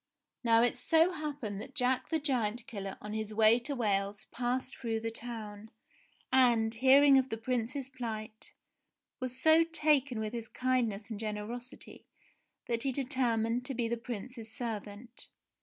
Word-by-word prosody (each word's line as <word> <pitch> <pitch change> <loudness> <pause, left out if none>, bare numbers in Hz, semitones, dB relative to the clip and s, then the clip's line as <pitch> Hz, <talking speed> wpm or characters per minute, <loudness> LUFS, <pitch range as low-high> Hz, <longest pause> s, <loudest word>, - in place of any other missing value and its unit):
Now 230 -1 +5
it 245 - +2
so 325 +7 +4
happened 290 - -4
that 265 +5 -10
Jack 255 -2 +2
the 320 - +1
Giant 245 -6 0
Killer 195 -3 -6
on 210 0 -6
his 215 -1 -4
way 220 +2 +6
to 275 +4 -2
Wales 205 -3 -1
passed 255 +2 -2
through 225 -3 -2
the 225 0 -3
town, 220 -2 -6 0.6
and, 235 -4 +4
hearing 270 +3 +6
of 265 0 -2
the 225 - -3
Prince's 250 +3 -2
plight, 220 -4 -6 0.7
was 255 -1 -3
so 315 +1 +6
taken 295 -7 +1
with 215 +1 -3
his 230 -1 -5
kindness 235 -5 -1
and 210 - -5
generosity 220 +4 -7 0.6
that 235 -1 -1
he 270 - 0
determined 245 -3 0
to 270 - -3
be 235 -1 0
the 235 - -1
Prince's 230 0 -7
servant. 225 0 -6
235 Hz, 155 wpm, -31 LUFS, 220-260 Hz, 0.7 s, way